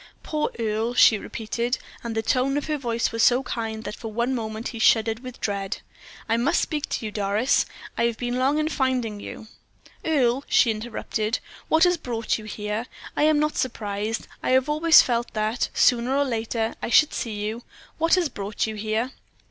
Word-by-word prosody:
"Poor 305 Hz, -1 st, -1 dB
Earle," 225 Hz, +1 st, -1 dB
she 220 Hz, -3 st, +6 dB
repeated; 235 Hz, +4 st, -2 dB, 0.3 s
and 230 Hz, -1 st, -4 dB
the 220 Hz, -, 0 dB
tone 260 Hz, +4 st, +1 dB
of 290 Hz, -, -2 dB
her 310 Hz, -, -1 dB
voice 235 Hz, -3 st, -1 dB
was 230 Hz, -, -1 dB
so 245 Hz, +3 st, +5 dB
kind 225 Hz, -3 st, -4 dB
that 210 Hz, -, -5 dB
for 225 Hz, -2 st, -7 dB
one 235 Hz, +4 st, 0 dB
moment 220 Hz, -2 st, -3 dB
he 230 Hz, -, -7 dB
shuddered 225 Hz, 0 st, +3 dB
with 255 Hz, -1 st, -9 dB
dread. 200 Hz, -1 st, -2 dB, 0.5 s
"I 225 Hz, -, +2 dB
must 240 Hz, +4 st, +2 dB
speak 300 Hz, -2 st, -2 dB
to -, -, -3 dB
you, 215 Hz, -, -3 dB
Doris. 205 Hz, +5 st, +1 dB, 0.3 s
I 235 Hz, -, +3 dB
have 235 Hz, -1 st, 0 dB
been 245 Hz, 0 st, -2 dB
long 275 Hz, +3 st, +2 dB
in 305 Hz, 0 st, +1 dB
finding 255 Hz, -8 st, -1 dB
you 220 Hz, -, -8 dB, 0.3 s
" -, -, -37 dB, 0.2 s
"Earle," 270 Hz, -4 st, +2 dB
she 235 Hz, -, +5 dB
interrupted, 220 Hz, 0 st, -2 dB, 0.3 s
"what 320 Hz, +1 st, +4 dB
has 355 Hz, -1 st, +4 dB
brought 230 Hz, -7 st, -2 dB
you 215 Hz, -, -10 dB
here? 210 Hz, +2 st, -4 dB, 0.3 s
I 295 Hz, -, +3 dB
am 310 Hz, -1 st, +4 dB
not 300 Hz, +1 st, 0 dB
surprised. 215 Hz, -2 st, -2 dB
I -, -, -2 dB
have 260 Hz, +1 st, +4 dB
always 310 Hz, +2 st, +6 dB
felt 240 Hz, -1 st, -1 dB
that, 215 Hz, +3 st, 0 dB
sooner 250 Hz, +2 st, +3 dB
or 285 Hz, -, +3 dB
later, 225 Hz, -2 st, -1 dB
I -, -, -3 dB
should 305 Hz, +5 st, +5 dB
see 225 Hz, -3 st, -3 dB
you. 215 Hz, +3 st, -3 dB, 0.4 s
What 330 Hz, +2 st, +4 dB
has 360 Hz, -3 st, +2 dB
brought 205 Hz, -5 st, -3 dB
you 220 Hz, -, -4 dB
here?" 220 Hz, +4 st, -2 dB
235 Hz, 195 wpm, -24 LUFS, 220-260 Hz, 0.5 s, she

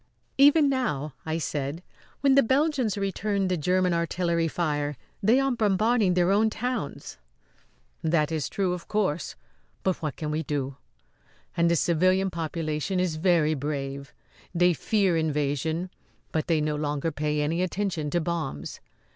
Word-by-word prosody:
"Even 290 Hz, +2 st, +7 dB
now," 155 Hz, -, -1 dB
I 160 Hz, +1 st, 0 dB
said, 150 Hz, +1 st, -3 dB, 0.4 s
"when 275 Hz, -1 st, +4 dB
the 275 Hz, -, +7 dB
Belgians 265 Hz, -4 st, +1 dB
return 200 Hz, 0 st, -1 dB
the 180 Hz, -, +1 dB
Grerman 180 Hz, +2 st, +1 dB
artillery 170 Hz, 0 st, 0 dB
fire 150 Hz, -4 st, -1 dB, 0.2 s
they 225 Hz, +6 st, +4 dB
are 270 Hz, 0 st, +1 dB
bombarding 215 Hz, -2 st, +2 dB
their 180 Hz, +1 st, +3 dB
own 215 Hz, +2 st, +4 dB
towns." 230 Hz, -, -4 dB, 0.8 s
"That 160 Hz, -1 st, +2 dB
is 155 Hz, -3 st, -2 dB
true, 190 Hz, -3 st, 0 dB
of 180 Hz, -1 st, -7 dB
course; 190 Hz, -7 st, -1 dB, 0.5 s
but 190 Hz, -2 st, 0 dB
what 155 Hz, -4 st, -3 dB
can 150 Hz, -1 st, -4 dB
we 155 Hz, +1 st, -1 dB
do? 140 Hz, -3 st, -3 dB, 0.8 s
And 170 Hz, 0 st, +3 dB
the 170 Hz, -, +3 dB
civilian 185 Hz, +4 st, +2 dB
population 165 Hz, +1 st, -2 dB
is 175 Hz, -4 st, 0 dB
very 160 Hz, -2 st, +3 dB
brave. 140 Hz, -1 st, -4 dB, 0.4 s
They 175 Hz, +1 st, +4 dB
fear 195 Hz, +1 st, +1 dB
invasion, 160 Hz, +2 st, -1 dB, 0.4 s
but 155 Hz, -2 st, -1 dB
they 160 Hz, -3 st, +2 dB
no 150 Hz, 0 st, 0 dB
longer 150 Hz, +1 st, -1 dB
pay 150 Hz, 0 st, -1 dB
any 165 Hz, +4 st, 0 dB
attention 185 Hz, -4 st, -2 dB
to 175 Hz, -, +1 dB
bombs. 160 Hz, -, -4 dB
170 Hz, 145 wpm, -26 LUFS, 150-195 Hz, 0.8 s, Even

